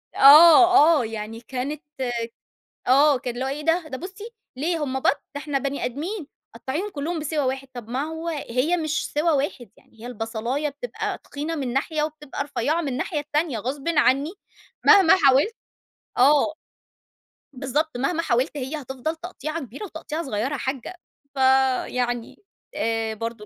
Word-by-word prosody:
آه، 325 +3 +8
آه. - - -2
يعني 220 +1 -6
كانت 270 +6 -5 1.1
آه. 280 +2 +5
كان 245 -1 -5
اللي 250 +2 -3
هو: - - -1
"إيه 285 +3 -4
ده؟ 325 0 +1
ده 260 - -5
بُصّي، 400 - -8 0.3
ليه 320 +3 -1
هم 265 -1 -3
بَط؟ - - -1 0.3
ده 285 - -4
إحنا 290 -2 -1
بني 275 +1 -3
أدمين، 315 - -4 0.3
قطعيّهم 325 +11 -4
كُلّهم 320 +1 -3
بسِوَى 305 0 -3
واحد." 265 +1 -2
طَب 240 -3 -8
ما 255 +3 -2
هو 320 +2 -5
هي 295 +1 0
مش 310 -2 -2
سِوَى 305 +3 +2
واحد 270 - -1
يعني 225 - -23
هي 235 - -8
البصلايّة 235 +5 -3
بتبقى 295 - -5
تخينة 300 +3 -5
من 265 -5 -3
ناحية 300 +4 -1
وبتبقى 300 -2 -4
رفيّعة 305 +3 -1
من 295 - -3
الناحية 275 +5 -2
التانية 295 -3 -1
غصبٍ 270 +7 -4
عنّي 295 -1 +2 0.5
مهما 380 -4 +7
حاولت 275 - +4 0.6
آه. 290 +4 +4 1.0
بالضبط. 275 +3 -2
مهما 320 +7 0
حاولت 255 +4 0
هي 285 +3 -4
هتفضل 265 +4 -4
تقطيعة 320 -2 -5
كبيرة 270 - -8
وتقطيعة 320 -2 -5
صغيرة 255 +1 -2
يا - - -2
حاجّة. 265 +5 -4 0.4
فيعني 260 - +1 0.3
آآ 225 -1 -1
برضه 230 0 -6
280 Hz, 155 wpm, -24 LUFS, 255-315 Hz, 1.1 s, آه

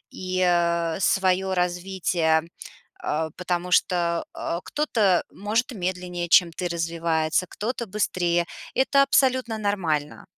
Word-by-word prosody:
и, 185 0 -4
э, 170 -1 +1
своё 190 0 +2
развитие, 180 -2 +1 0.7
э, 160 +1 -1
потому 180 0 -2
что, 180 - +3 0.4
э, 170 - -3
кто-то 220 - +1
может 220 +6 -1
медленнее, 180 -2 -3
чем 175 0 +7
ты 175 +2 -3
развивается, 165 0 0
кто-то 235 +2 -4
быстрее. 175 -4 0 0.3
Это 265 +1 +2
абсолютно 260 -4 +2
нормально. 175 -8 -2
180 Hz, 110 wpm, -24 LUFS, 170-200 Hz, 0.7 s, чем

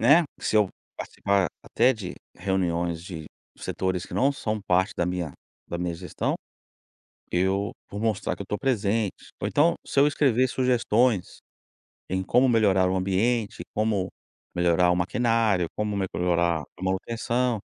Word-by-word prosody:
né, 145 +9 +6 0.2
se 110 - +1
eu 105 -3 +4 0.3
participar 100 -2 0 0.2
até 125 +3 +3
de 100 -6 -6 0.2
reuniões 85 -3 -1
de 80 -4 -7 0.3
setores 95 -1 -2
que - - -13
não 135 +2 +3
são 110 -6 -3
parte 95 0 +2
da 85 - +1
minha 90 -4 -2 0.4
da 85 - -3
minha 90 -1 -2
gestão, 90 +2 -2 1.0
eu 95 +3 +1 0.2
vou 100 - -5
mostrar 110 -2 0
que - - -20
eu - - -3
estou 105 +2 -3
presente. 110 -5 0
Ou, - - -1
então, 160 +4 +3
se 140 - +2
eu 145 - +6
escrever 130 -4 +3
sugestões 120 -5 +1 0.7
em 95 +1 -1
como 125 +7 +3
melhorar 100 -6 +4
o 95 - 0
ambiente, 100 +4 0
como 105 -3 +1 0.5
melhorar 90 0 +3
o - - +2
maquinário, 110 0 +2
como 105 -1 -1
melhorar 85 -3 +1 0.2
a - - -6
manutenção 115 +5 0
100 Hz, 150 wpm, -26 LUFS, 90-115 Hz, 1.0 s, né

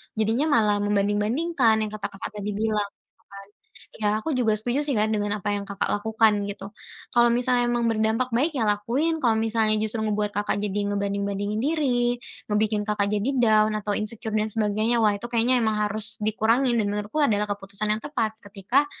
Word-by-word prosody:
jadinya 225 +7 +1
malah 210 -2 +3
membanding-bandingkan 210 +7 +1
yang 215 - -4
kata 210 -2 -4
Kakak 200 0 -8
tadi 205 +1 -4
bilang, 210 -1 0
gitu, - - -41
kan. 200 0 -11 0.5
Ya, 210 - +2
aku 320 - -4
juga 225 -3 +2
setuju, 245 +6 -1
sih, 285 - 0
Kak, 215 +1 +2
dengan 205 0 -1
apa 205 - -2
yang 200 - -4
Kakak 200 - -2 0.2
lakukan 220 0 +3 0.2
gitu. 200 +1 -7 0.4
Kalau 240 0 +5
misalnya 245 0 +2
emang 240 -1 0
berdampak 225 +3 0
baik, 295 +8 +2
ya, 225 - +1
lakuin, 235 +11 0
kalau 225 -3 +3
misalnya 220 -1 +1
justru 220 +1 -2
ngebuat 210 -1 0
Kakak 205 0 0
jadi 205 0 -2
ngebanding-bandingin 200 +1 -2
diri, 250 -5 +1 0.3
ngebikin 210 0 +1
Kakak 205 -1 +1
jadi 210 +5 0
down 215 -2 +4
atau 205 -1 -2
insecure 215 +1 -5
dan 215 +1 0
sebagainya. 215 +2 +1
Wah, 210 -1 +4
itu 225 - -8
kayaknya 240 +1 +2
emang 220 -1 +1
harus 220 +2 -6
dikurangin 230 +3 +2
dan 205 - -1
menurutku 210 +8 -2
adalah 210 -7 +2
keputusan 200 +1 -4
yang 215 - -4
tepat 225 -7 -2
ketika, 205 +8 +1
215 Hz, 185 wpm, -25 LUFS, 205-235 Hz, 0.5 s, Kalau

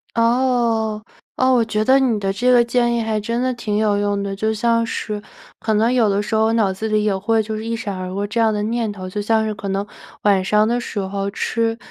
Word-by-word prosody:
哦， 230 -2 +1 0.3
哦， 260 0 +3
我 240 -2 +4
觉 215 -1 -1
得 265 +2 +5
你 240 -5 +1
的 195 -1 -1
这 245 +6 +2
个 245 -1 +6
建 240 0 +1
议 235 - 0
还 220 -1 -1
真 230 +3 -2
的 255 0 0
挺 215 -4 -3
有 210 -1 +2
用 205 0 0
的， 200 0 -3
就 220 +2 0
像 230 +1 +1
是 210 -2 -4 0.4
可 220 -1 0
能 225 +4 +2
有 230 -4 +3
的 200 0 +1
时 210 - -5
候 220 0 +3
脑 210 -4 +2
子 220 +4 -4
里 215 0 +1
也 210 -2 +1
会 220 +3 +1
就 215 +1 -4
是 215 - -5
一 230 +1 -2
闪 205 -4 -4
而 185 0 -5
过 200 +2 -2
这 215 +3 -3
样 225 -1 +4
的 210 -1 -2
念 225 0 -1
头， 185 -2 -7
就 205 +3 -4
像 220 +1 +1
是 215 - -2
可 205 -1 -7
能 195 +1 -1 0.4
晚 195 -2 +3
上 210 +2 +3
的 240 +2 +1
时 205 - -5
候 195 +1 -3
吃 225 +2 -1
220 Hz, 270 characters per minute, -20 LUFS, 205-230 Hz, 0.4 s, 个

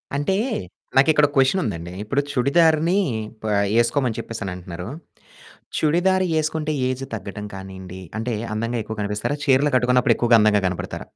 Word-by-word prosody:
అంటే 145 +7 0 0.6
నాకిక్కడో 150 +2 +5
క్వెషన్ 135 +8 +3
ఉందండి. 85 +1 -4
ఇప్పుడు 130 +7 0
చుడిదారిని 160 +6 +3 0.5
ప - - -6 0.4
ఏసుకోమని 120 0 0
చెప్పేసని 110 -5 -5
అంటున్నారు. 90 0 -7 0.9
చుడిదారు 185 +4 +2
యేసుకుంటే 155 0 0 0.2
ఏజ్ 130 +1 -3
తగ్గడం 105 -1 -6
కానియండి, 95 -1 -9 0.2
అంటే 115 +1 -2 0.2
అందంగా 115 +1 -2 0.2
కనిపిస్తారా? 105 +7 -2
చీరలు 140 +2 +3
కట్టుకున్నప్పుడు 125 0 +3
ఎక్కువగా 120 -1 +4
అందంగా 105 -1 +4
కనపడతార? 90 -1 -4
125 Hz, 125 wpm, -22 LUFS, 105-150 Hz, 0.9 s, నాకిక్కడో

